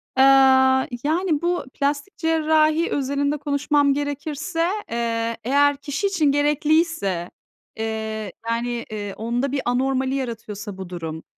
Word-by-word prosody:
Aaa, 265 0 +5 0.2
yani, 320 0 +1
bu 350 -3 -1
plastik 290 +7 -2
cerrahi 315 0 +2
özelinde 280 +1 0
konuşmam 285 0 +1
gerekirse, 290 +3 -2 0.2
eee, 230 -1 -1
eğer 285 +3 +3
kişi 290 +7 -2
için 370 -6 0
gerekliyse, 295 - +1 0.5
eee, 220 -2 -3 0.2
yani, 235 0 -2
eee, 205 -2 -5
onda 240 +6 -2
bir 280 -2 -1
anormali 260 +2 0
yaratıyorsa 220 -5 -5
bu 190 -2 -7
durum, 160 -3 -6
275 Hz, 115 wpm, -22 LUFS, 230-300 Hz, 0.5 s, Aaa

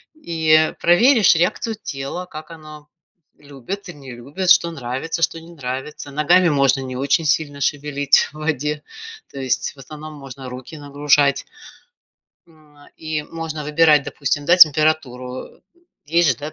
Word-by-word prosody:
и 160 - +2
проверишь 220 +4 +5
реакцию 180 +7 0
тела, 140 +6 -5
как 155 -1 -11
оно 155 -2 -12 0.5
любит 145 +8 -8
и 175 - -7
не 135 -3 -12
любит, 145 +10 -4
что 170 -1 +5
нравится, 140 +3 -5
что 165 0 0
не 165 +1 -14
нравится. 135 0 -6
Ногами 170 +5 +3
можно 140 -2 +2
не 130 -1 -6
очень 140 +6 0
сильно 145 -1 0
шевелить 145 0 +1
в - - -29
воде, 150 -1 -3 0.5
то 140 - -8
есть, 130 -2 -1
в - - -19
основном, 155 +3 -10
можно 135 -2 -10
руки 130 +6 -9
нагружать, 145 -1 +1 1.0
м, 155 -3 -24 0.2
и 155 -1 -4
можно 160 -1 -6
выбирать, 150 0 +4
допустим, 145 +1 -3
да, 175 +4 +4
температуру. 150 -6 +2 0.4
Есть 165 0 +2
же, 120 - 0
да, 150 +3 -7
150 Hz, 145 wpm, -20 LUFS, 140-165 Hz, 1.0 s, проверишь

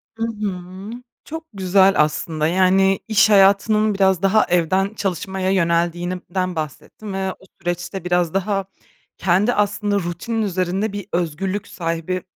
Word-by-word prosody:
Hı 225 - -4
hı. 195 -2 -6 0.3
Çok 320 +1 -7
güzel 190 0 +4
aslında, 155 0 -2
yani, 190 +2 +3
iş 220 0 +4
hayatının 210 +2 +4
biraz 190 -2 +2
daha 195 +2 +4
evden 185 +4 +1
çalışmaya 190 -1 -2
yöneldiğinden 175 +1 -1
bahsettin 160 +7 -6
ve 190 -1 -2
o - - -23 0.2
süreçte 175 +2 -4
biraz 175 -2 +1
daha 195 0 0 0.5
kendi 195 +6 +2
aslında 205 0 0
rutinin 185 +6 -3
üzerinde 190 +1 -1
bir 205 -2 -5
özgürlük 180 +4 -2
sahibi 165 +1 -3
190 Hz, 125 wpm, -20 LUFS, 175-200 Hz, 0.5 s, güzel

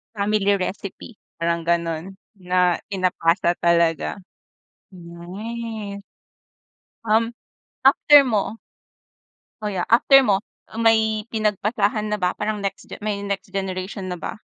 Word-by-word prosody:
Family 210 0 0 0.2
recipe, 195 +4 -6 0.2
parang 170 0 0
ganun 170 +2 -2 0.2
na 180 -1 +2 0.2
pinapasa 175 -2 +1
talaga, 170 +2 +2 0.7
hmm. 200 +5 -7 1.1
Um, 230 +2 +1 0.5
after 285 +1 +7
mo, 220 0 -1 1.1
oh 210 - -1
yeah, 180 -2 -3
after 270 +4 +6
mo, 205 -5 +1 0.3
may 220 -2 +2
pinagpasahan 210 0 0
na 210 - -1
ba, 180 0 0
parang 210 -1 -2
next 195 -1 -5
ge - - -8
may 205 -1 -3
next 200 -1 -4
generation 190 0 -4
na 175 - -6
ba - - -5
200 Hz, 110 wpm, -22 LUFS, 180-215 Hz, 1.1 s, after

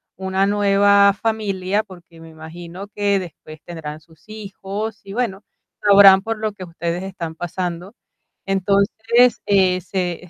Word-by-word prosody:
una 190 +1 -1
nueva 200 0 +4
familia, 205 -3 -1
porque 170 -3 -16
me 165 - -12
imagino 170 +4 -10
que 205 -1 0
después 155 -3 -11
tendrán 155 -3 -7
sus 160 0 -24
hijos 210 0 -6
y, 195 - -10
bueno, 210 -4 -2 0.4
sabrán 200 -1 +8
por 225 +1 -4
lo 215 -1 -3
que 190 - -10
ustedes 170 +1 -4
están 180 -4 -6
pasando. 175 +3 -5 0.5
Entonces, 210 +5 +2
eh, 185 -2 +3
se, 180 -2 -4
195 Hz, 135 wpm, -20 LUFS, 175-205 Hz, 0.5 s, sabrán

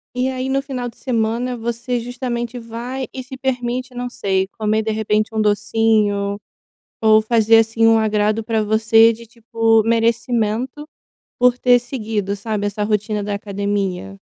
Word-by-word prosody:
E 250 +1 0
aí, 260 0 -3
no 270 +1 0
final 255 -3 -5
de - - -19
semana, 240 0 -1
você 235 +1 -3
justamente 240 0 -4
vai 240 +3 -5
e 260 - -5
se 265 +1 -10
permite, 255 -1 -2
não 245 0 -4
sei, 190 -5 -1
comer, 215 0 +1
de 220 0 -2
repente, 215 0 -1
um 220 - +1
docinho 205 -1 +1 0.6
ou 220 0 +6
fazer, 225 0 +4
assim, 225 0 +2
um 225 0 +5
agrado 215 0 +1
para 220 -1 0
você, 225 +1 +4
de 230 +1 -11
tipo, 225 -1 +1
merecimento 230 +4 0 0.5
por 250 0 +4
ter 250 0 +4
seguido, 220 -5 -3
sabe, 205 0 -3
essa 205 +1 -3
rotina 210 0 -1
da 205 0 -3
academia. 200 - -3
225 Hz, 155 wpm, -19 LUFS, 215-245 Hz, 0.6 s, ou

